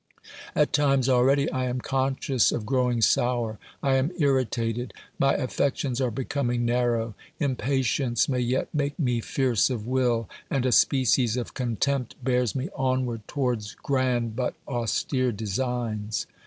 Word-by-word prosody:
At 150 - +2
times 140 -3 +3
already 135 +2 +4
I 130 -1 -1
am 125 0 -2
conscious 135 -1 +1
of 110 - -3
growing 125 -2 +1
sour, 120 -3 +1 0.2
I 135 -1 +3
am 130 +3 +1
irritated, 125 -5 0 0.3
my 135 0 +3
affections 135 -1 -1
are 130 - +2
becoming 120 0 -1
narrow; 120 -2 +1 0.3
impatience 130 -3 +1
may 130 -2 0
yet 125 +2 -1
make 145 -1 -1
me 125 -7 0
fierce 125 -1 +1
of 115 -5 -3
will, 120 -3 +1 0.2
and 135 -2 0
a 130 - +2
species 125 -2 +3
of 120 - -4
contempt 125 +1 -1
bears 125 -3 +1
me 135 +5 -2
onward 130 -4 -1
towards 125 -7 -2
grand 125 -4 0
but 125 0 -1
austere 125 - 0
designs. 110 0 -2
125 Hz, 140 wpm, -26 LUFS, 120-135 Hz, 0.3 s, already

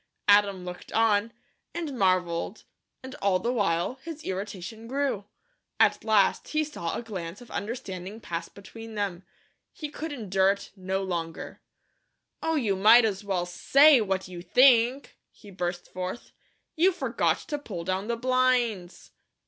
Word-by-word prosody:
Adam 200 -3 +4
looked 180 0 -8
on, 225 0 +2 0.4
and 320 -5 -4
marvelled 185 -2 0 0.4
and 260 0 -8
all 195 -2 +3
the 235 +7 -1
while 200 +2 0
his 320 0 -8
irritation 200 +3 -6
grew. 265 -6 -1 0.5
At - - +3
last 215 -3 +2
he 310 0 0
saw 230 - -4
a - - -4
glance 185 -5 -6
of 245 - -14
understanding 200 -2 -5
pass 170 -6 -5
between 225 +3 -11
them. 195 -4 -2 0.5
He 300 - -7
could 315 +1 -6
endure 195 -7 +2
it 200 - -11
no 190 0 -2
longer. 170 -3 -5 0.8
"Oh, 325 0 0
you 225 -10 +1
might 220 +5 +7
as 205 -2 -2
well 190 -3 -1
SAY 275 - +5
what 190 -3 -1
you 180 -1 -8
think," 250 +6 +4
he 205 - -16
burst 175 -1 -4
forth. 185 +5 -5 0.4
"You 355 +4 +4
forgot 365 - 0
to 295 - -2
pull 195 -11 -6
down 190 +3 -2
the 235 0 -1
blinds." 245 -7 0
205 Hz, 150 wpm, -27 LUFS, 185-245 Hz, 0.8 s, might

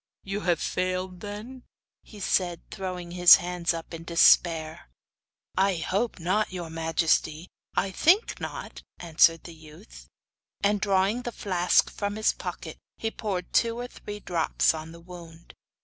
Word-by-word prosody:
'You 195 +1 -4
have 175 -5 0
failed, 185 0 -2
then?' 210 +6 -8 0.4
he 210 - -14
said, 180 -3 0
throwing 180 -2 -5
up - - -9
his 175 -1 +10
hands 175 -1 -2
in 165 0 -7
despair. 165 - +3 0.7
'I 195 0 +2
hope 200 +7 -2
not, 185 +6 0
your 175 -3 -6
majesty; 160 0 0 0.3
I 195 - 0
think 360 - +2
not,' - - -7 0.2
answered 165 -1 +3
the 170 - -10
youth. 150 - -15 0.6
And 205 0 +2
drawing 200 +3 +1
the 240 - -5
flask 180 -5 +1
from 205 0 -4
his 215 0 +2
pocket, - - -7 0.2
he 225 - -3
poured 190 -6 -4
two 230 0 +2
or 245 - -4
three 210 -3 -9
drops 170 -5 +1
on 160 0 -7
the 170 - -12
wound. 170 -1 -13
180 Hz, 150 wpm, -26 LUFS, 165-205 Hz, 0.7 s, his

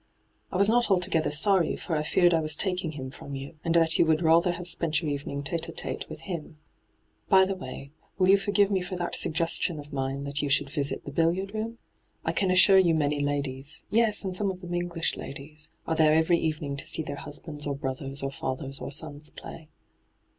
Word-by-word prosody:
' - - -42
I - - -2
was 200 +1 +4
not 240 +1 +3
altogether 180 -4 +2
sorry, 170 +3 +4
for 165 - -4
I 150 - 0
feared 175 +3 +3
I 165 - +3
was 155 0 +2
taking 180 -3 -2
him 130 -3 -7
from 140 +1 -8
you, 140 +3 -8
and 165 0 0
that 165 -1 +3
you - - +6
would 160 +1 +2
rather 170 +2 +4
have 175 0 -6
spent 160 -3 +1
your 155 -3 -3
evening 140 0 -4
tite 160 +4 -2
^tite - - -4
with - - -9
him. 165 -4 -6 0.7
By 190 -1 +6
the 195 - -2
way, 140 -5 -8 0.3
will 185 -1 +3
you 195 +1 +6
forgive 205 0 +2
me 190 -2 +1
for 180 +1 -5
that 175 -1 -2
suggestion 165 0 +1
of 145 0 -11
mine 135 0 -2
that 140 +1 -3
you 145 - -2
should 140 0 +1
visit 145 -1 -3
the 140 - -6
billiard 170 +6 0
room? 225 +2 -4 0.5
I - - +1
can 195 - 0
assure 190 +1 +6
you 170 -3 +3
many 145 -1 0
ladies 145 +1 -3
— - - -43
yes, 220 -2 +3
and 185 -1 -1
some 200 +1 +1
of 185 -1 -6
them 175 -1 -8
EngUsh 175 -1 -2
ladies 150 +3 -9
— - - -43
are 165 - +1
there 155 -1 +4
every 160 +2 +3
evening 150 -3 -2
to - - -4
see 160 - -1
their 145 -1 -6
husbands 150 0 -3
or 140 - -1
brothers 135 0 -5
or 135 - -2
fathers 135 0 -4
or - - -5
sons 150 0 0
play.' 160 -1 -11
160 Hz, 225 wpm, -27 LUFS, 145-180 Hz, 0.7 s, you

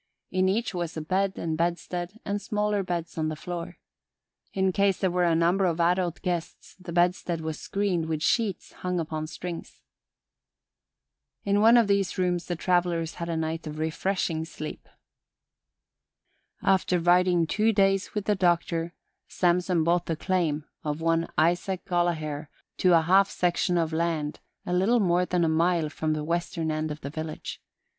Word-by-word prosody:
In 185 0 +2
each 220 +3 0
was 175 -3 -3
a - - -2
bed 190 +4 0
and 160 -1 -2
bedstead 175 +4 -2
and 205 0 -2
smaller 210 0 0
beds 170 -3 -4
on 155 0 0
the 155 - -3
floor. 170 +2 -6 0.7
In 190 -1 +1
case 200 0 +2
there 190 -2 0
were 180 0 +2
a 170 -1 +3
number 175 +4 +3
of 170 -2 0
adult 175 0 +1
guests 175 -2 -4
the 180 -1 -8
bedstead 175 0 +1
was 160 -1 -4
screened 190 -5 -1
with 160 -1 -2
sheets 210 -1 0
hung 180 -1 -2
upon 155 -1 -3
strings. 175 +1 -7 1.6
In 200 0 +2
one 230 +2 +7
of 235 - +5
these 200 -1 +1
rooms 180 -2 0
the 175 - -1
travelers 175 -2 0
had 170 - -3
a 165 - -1
night 160 0 -3
of 150 0 -6
refreshing 160 +1 -1
sleep. 155 -1 -8 1.7
After 185 -1 +3
riding 175 0 +4
two 215 +7 +2
days 195 -1 +2
with 210 -1 -2
the 210 - +3
Doctor, 170 -2 0 0.3
Samson 180 -1 +1
bought 170 +1 +1
the 165 - 0
claim 155 -4 0 0.2
of 150 0 -2
one 165 0 +1
Isaac 175 +3 +1
Gollaher 160 -4 -1 0.3
to 180 -2 +5
a - - +3
half 190 +4 +4
section 175 0 +1
of 165 -1 0
land 160 -2 -1 0.3
a 180 - -2
little 200 +7 +3
more 180 -3 +2
than 180 -1 +1
a - - +3
mile 165 0 +2
from 155 +1 -1
the 155 -1 -2
western 170 0 -1
end 155 0 -2
of 150 0 -6
the 140 - -6
village. 155 0 -6
175 Hz, 165 wpm, -27 LUFS, 160-185 Hz, 1.7 s, one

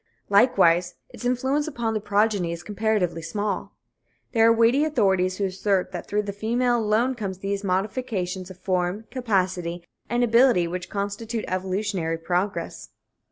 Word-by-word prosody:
Likewise, 180 -5 +4
its - - -10
influence 265 +5 0
upon 235 -7 -2
the 215 - 0
progeny 205 -3 +1
is 170 +1 -6
comparatively 210 -5 0
small. 205 +6 -3 0.6
There 225 -1 +4
are - - +7
weighty 230 +5 +4
authorities 190 -11 +1
who 200 - 0
assert 195 0 0
that - - -6
through 210 +1 0
the 200 -1 -5
female 240 +4 +1
alone 225 +4 +2
comes 200 -6 -5
those 195 +1 -3
modifications 190 -2 -2
of 185 - -11
form, 185 +3 -1
capacity 185 -8 -1 0.2
and 240 +1 +1
ability 235 -6 +4
which 180 +1 -5
constitute 215 +3 -3
evolutionary 185 -2 -2
progress. 180 +4 -2
205 Hz, 145 wpm, -24 LUFS, 185-230 Hz, 0.6 s, are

